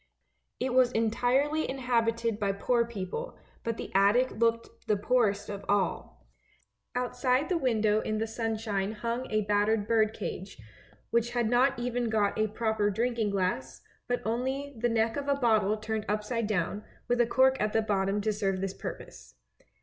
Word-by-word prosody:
It 255 0 -1
was 255 -1 +5
entirely 250 +7 +1
inhabited 230 -4 0
by 200 -1 0
poor 235 +4 +1
people, 235 - -5 0.3
but 230 -1 -2
the - - -6
attic 205 +7 +4
looked 230 0 -1
the 210 - +2
poorest 205 -2 +1
of 200 -1 -6
all. 180 - -1 0.7
Outside 250 +3 0
the 365 - +2
window 220 -6 +2
in 215 - -2
the 220 - 0
sunshine 220 -3 -2
hung 235 +3 -3
a 215 -1 +1
battered 205 +1 +1
bird 220 -1 +3
cage, 195 -2 -6 0.5
which 235 +1 +1
had 240 -2 +1
not 260 +3 +3
even 240 -1 -1
got 210 -2 +1
a 215 - +3
proper 220 -1 0
drinking 230 +1 0
glass, 185 -9 -2 0.3
but 245 0 -1
only 265 +5 -2
the 240 +1 0
neck 225 +1 +1
of 285 0 -4
a 280 - +3
bottle 220 -5 +2
turned 215 0 -3
upside 210 +2 -1
down, 205 0 -1 0.2
with 245 0 +2
a 235 - +2
cork 265 +2 +3
at 210 0 +1
the 225 0 +2
bottom 200 -1 0
to 215 +1 0
serve 195 -2 -1
this 195 0 -2
purpose. - - -9
225 Hz, 165 wpm, -29 LUFS, 210-245 Hz, 0.7 s, was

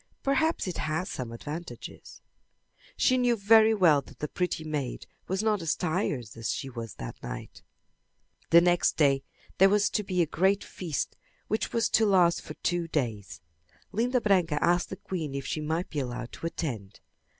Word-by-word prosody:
"Perhaps 315 +4 +1
it 180 - -3
has 160 +5 -2
some 125 -3 -5
advantages." 150 +8 -8 0.8
She 255 -1 +3
knew 245 -1 +3
very 220 +1 +5
well 165 -8 +5
that - - -16
the 150 - -3
pretty 180 -1 -2
maid 150 -5 -4 0.2
was 190 +3 -1
not 215 -3 +1
as 165 -2 0
tired 160 - -1
as 115 -1 -2
she 135 - -4
that 115 - -7
night. - - -7 0.9
The 170 +1 +8
next 175 0 +3
day 140 -3 +4 0.4
there 195 +1 +7
was 205 0 +3
to 215 - +1
be 185 -3 +1
a - - 0
great 190 +6 +1
feast 165 -7 -4 0.3
which 215 - -1
was 230 -1 +2
to 220 -1 +4
last 180 -3 +4
for - - -9
two 175 -1 -1
days. 115 - -3 0.5
Linda 245 +5 +1
Branca 180 -8 +2
asked 175 +2 +2
the - - -5
queen 160 -8 -5
if 140 - -4
she 155 - -2
might 160 +4 -2
be 150 - -2
allowed 125 -2 -4
to 165 - -5
attend. 115 - -5
170 Hz, 175 wpm, -28 LUFS, 145-200 Hz, 0.9 s, The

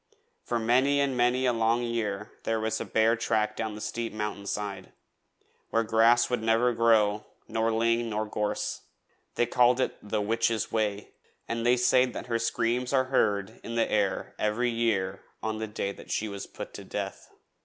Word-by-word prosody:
For 120 - -1
many 130 +5 +3
and 140 -2 +1
many 125 +1 +2
a 125 - +3
long 115 +1 +2
year 105 -4 -2
there 115 0 0
was 110 0 -1
a - - -3
bare 110 +1 +3
track 110 -2 0
down 110 -1 -3
the 105 - -8
steep 115 +1 -3
mountain 105 -1 -4
side, 100 -2 -4 0.8
where 115 - +2
grass 115 +2 +4
would 125 -2 -1
never 115 +2 +3
grow, 110 -2 +3 0.2
nor 115 0 0
ling, 115 +1 +1
nor 110 0 -1
gorse. 105 0 -2 0.5
They 120 - +2
called 125 +1 +3
it - - 0
'The 105 +1 -2
Witch's 115 +1 0
Way,' 105 -2 -1 0.4
and 115 0 -2
they 120 +1 +4
say 125 +1 +4
that 125 - -6
her 115 -2 -1
screams 120 +2 0
are 130 -1 +2
heard 105 -3 +1
in 115 - -5
the 115 - +1
air 100 -3 0
every 120 +3 +1
year 105 -5 0 0.2
on 110 -1 -2
the 110 - -3
day 100 -1 -3
she 110 - -1
was 100 -1 -6
put - - -8
to - - -8
death. - - -5
115 Hz, 180 wpm, -28 LUFS, 105-120 Hz, 0.8 s, grass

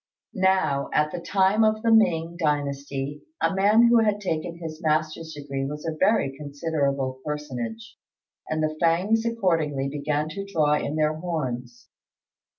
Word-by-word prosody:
Now, 185 -8 +1
at 150 0 +2
the - - -4
time 195 +4 +2
of 215 0 +2
the 230 - +3
Ming 170 -6 +3
dynasty 145 -2 -2 0.2
a - - +1
man 205 +4 +5
who 235 0 +6
had 210 -2 +2
taken 170 -3 -3
his 160 -1 -7
master's 155 0 -1
degree 140 -2 -4
was 150 +3 -5
a 160 -1 -2
very 185 -6 +2
considerable 140 -3 -2
personage, 125 -7 -5 0.5
and 155 0 -1
the 155 0 -1
Fêngs 200 +8 +2
accordingly 160 -10 0
began 150 +1 -1
to 200 +5 -5
draw 160 -7 +1
in 150 0 -1
their 155 0 +2
horns. 130 -8 -4
155 Hz, 150 wpm, -25 LUFS, 145-190 Hz, 0.5 s, who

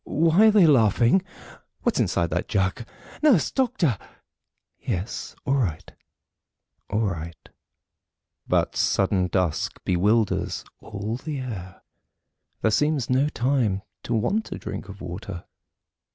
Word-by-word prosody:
Why 165 +7 +4
are - - +8
they 210 -4 +6
laughing? 120 - +4 0.6
What's - - +1
inside 85 -1 +1
that - - -1
jug? 95 +5 -1 0.3
"Nurse! 270 - +4
Doctor!" 235 - +1 0.8
"Yes; 95 +6 -4
all 135 - +1
right, 85 - -2 1.0
all 105 +2 0
right." 85 -6 -4 1.0
But - - +1
sudden 95 -2 +2
dusk 90 -4 -1
bewilders 105 +4 +1
all 105 +3 -5
the 150 +2 -5
air 95 -8 -7 0.8
There 110 - +3
seems 145 0 +1
no 135 +4 +3
time 120 -8 0 0.2
to 120 - -2
want 200 - 0
a - - -4
drink 100 -1 -6
of 100 0 -10
water. 90 +1 -7
110 Hz, 120 wpm, -25 LUFS, 95-145 Hz, 1.0 s, are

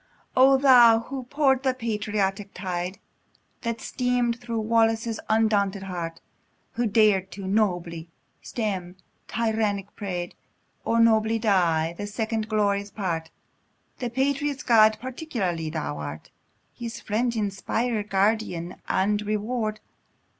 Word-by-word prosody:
O 270 +1 +6
Thou! 245 -4 +7
who 260 +1 -6
pour'd 270 -1 +2
the 260 -1 +1
patriotic 210 -4 -2
tide, 180 0 -3 0.6
That 230 -1 -3
stream'd 245 -2 0
thro' 235 -2 -3
Wallace's 225 0 +1
undaunted 205 -3 +2
heart, 170 -3 -5 0.5
Who 240 0 0
dar'd 205 -3 +3
to 195 -1 -7
nobly 175 -5 -1 0.3
stem 190 -6 -3 0.3
tyrannic 215 -3 -1
pride, 180 -4 -4 0.5
Or 230 - +2
nobly 225 -1 +4
die, 170 -7 +2
the 205 +3 -5
second 220 +1 -2
glorious 205 -2 +1
part: 170 -6 -3 0.7
(The 245 -2 -2
patriot's 275 +3 -1
God 220 -2 +5
peculiarly 230 - -3
thou 75 - -4
art, 75 0 -7 0.4
His 235 -1 -6
friend, 235 +3 -1
inspirer, 215 +2 -1
guardian, 195 -3 0
and 205 +2 +1
reward!) 215 +1 -2
215 Hz, 115 wpm, -25 LUFS, 195-235 Hz, 0.7 s, Thou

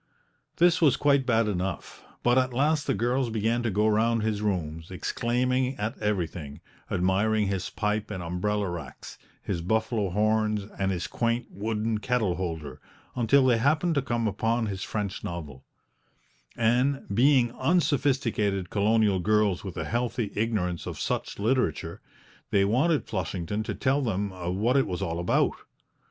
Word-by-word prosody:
This 175 0 +4
was 150 -6 +5
quite 140 -2 +3
bad 115 -2 +3
enough, 95 -2 -4 0.2
but 120 0 +4
at 130 -1 +1
last 145 +3 +1
the 135 - +1
girls 120 +2 0
began 115 +2 0
to 120 - 0
go 105 +2 +2
round 110 +1 +2
his 110 -2 -1
rooms, 80 -5 -2
exclaiming 125 +7 -1
at 110 +5 -2
everything, 85 -8 -3 0.3
admiring 100 +4 +1
his 95 -1 -2
pipe 105 0 -2
and 95 -4 -5
umbrella 100 +4 -1
racks, 85 -1 -8 0.2
his 90 -4 -2
buffalo 110 +2 0
horns 105 +1 +1 0.2
and 95 0 +1
his 90 -2 -2
quaint 115 0 -1
wooden 110 +1 -2
kettle 115 -5 0
holder, 80 -5 -5 0.3
until 125 +3 +4
they 120 -3 +4
happened 155 +7 +2
to 140 - +1
come 120 -3 -1
upon 110 +3 0
his 100 -3 -4
French 100 -2 -3
novel; 75 -7 -6 0.9
and, 125 +4 +2
being 125 +1 +4
unsophisticated 130 - +1
colonial 105 -1 +2
girls 105 -1 +2
with 95 -4 -7
a - - -2
healthy 120 -2 -2
ignorance 105 -6 -1
of - - -6
such - - -2
literature, 110 - -1 0.5
they 100 -1 +3
wanted 135 +7 +2
Flushington 95 +1 -3
to 110 - -4
tell 135 +2 +1
them 100 -5 -1 0.3
what 120 +5 +3
it 135 - +2
was 90 -3 -3
all 85 0 -2
about. 85 - +2
110 Hz, 150 wpm, -27 LUFS, 95-125 Hz, 0.9 s, was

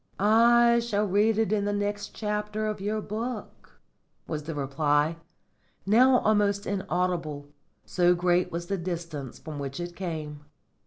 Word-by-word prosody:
"I 235 +3 +5
shall 215 -3 0
read 210 +3 +2
it 220 -2 +1
in 205 -1 +1
the 205 - 0
next 205 0 -3
chapter 210 0 -2
of 215 -2 -3
your 215 +2 -1
book," 230 +5 -6 0.5
was 155 -1 -3
the 160 0 -5
reply, 145 +3 +1 0.7
now 250 +6 +5
almost 205 -1 +2
inaudible, 175 -6 -2 0.4
so 180 -1 +3
great 180 0 +1
was 170 +1 -4
the 195 +1 -2
distance 170 -6 -5
from 155 -2 -8
which 140 +2 -5
it 175 0 -5
came. 155 -5 -5
195 Hz, 145 wpm, -27 LUFS, 165-210 Hz, 0.7 s, I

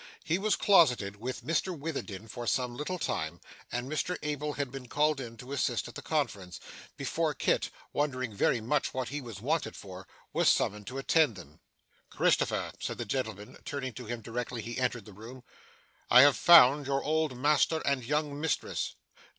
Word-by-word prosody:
He 165 +4 0
was 215 +1 +2
closeted 125 - +4
with 125 +2 -5
Mr 165 +3 0
Witherden 135 -9 -5
for 120 +2 -6
some 125 -2 0
little 150 +7 -3
time, 80 - -3 0.3
and 120 +1 -3
Mr 155 +5 -2
Abel 150 0 -2
had 140 -3 -3
been 135 -2 -8
called 150 +2 +1
in 115 -2 -8
to 125 +4 -10
assist 125 -4 0
at 120 - -10
the - - -7
conference, 100 - -2 0.4
before - - -1
Kit, - - +1 0.2
wondering 130 -5 -1
very 110 +3 +1
much 135 +5 0
what 130 -1 -2
he 145 +1 -4
was 115 -6 -9
wanted 155 +6 -1
for, 95 -1 -10 0.3
was - - +4
summoned 105 0 +1
to 130 - -6
attend 140 -2 +3
them. 80 -4 -13 0.5
'Christopher,' - - +1
said - - -4
the - - -4
gentleman, 110 -3 -4
turning 130 -3 -4
to 125 - -8
him 120 0 -4
directly 115 +1 -4
he 120 +3 -5
entered 125 -2 -1
the 105 - -12
room, 120 +5 -11 0.7
'I 125 - +9
have 145 0 +7
found 145 -4 +7
your 135 0 0
old 155 -4 0
master 150 +4 +3
and 140 -3 +1
young 145 +2 -1
mistress. 160 - -2
130 Hz, 180 wpm, -30 LUFS, 115-150 Hz, 0.7 s, I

